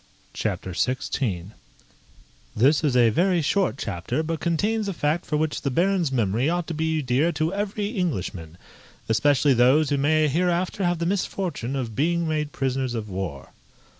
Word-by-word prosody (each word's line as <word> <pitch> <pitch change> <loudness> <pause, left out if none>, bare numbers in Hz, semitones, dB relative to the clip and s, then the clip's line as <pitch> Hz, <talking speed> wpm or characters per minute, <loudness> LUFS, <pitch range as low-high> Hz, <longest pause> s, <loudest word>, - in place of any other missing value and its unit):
CHAPTER 95 - -3
XVI 105 - -2 1.1
_This 140 +8 +4
is 135 -5 +2
a 120 -2 +5
very 175 - +2
short 185 -1 +1
chapter, 100 - -3
but 165 0 -3
contains 205 +7 0
a 195 - -2
fact 155 +3 -1
for 150 - 0
which 155 0 -1
the 140 - -1
Baron's 175 +2 +1
memory 120 +2 +1
ought 175 0 -1
to - - -2
be 160 -1 -1
dear 135 +6 +2
to 155 +3 -1
every 205 0 -2
Englishman, 95 - -3 0.5
especially 140 +5 +3
those 130 +5 +4
who 145 - +2
may 155 +2 +3
hereafter 175 +5 0
have 175 0 +1
the 170 - -2
misfortune 180 -8 -2
of 120 -5 -4
being 170 +4 +1
made 150 -2 -1
prisoners 130 -2 -2
of 110 -2 -4
war. 90 -8 -5
150 Hz, 165 wpm, -24 LUFS, 125-170 Hz, 1.1 s, a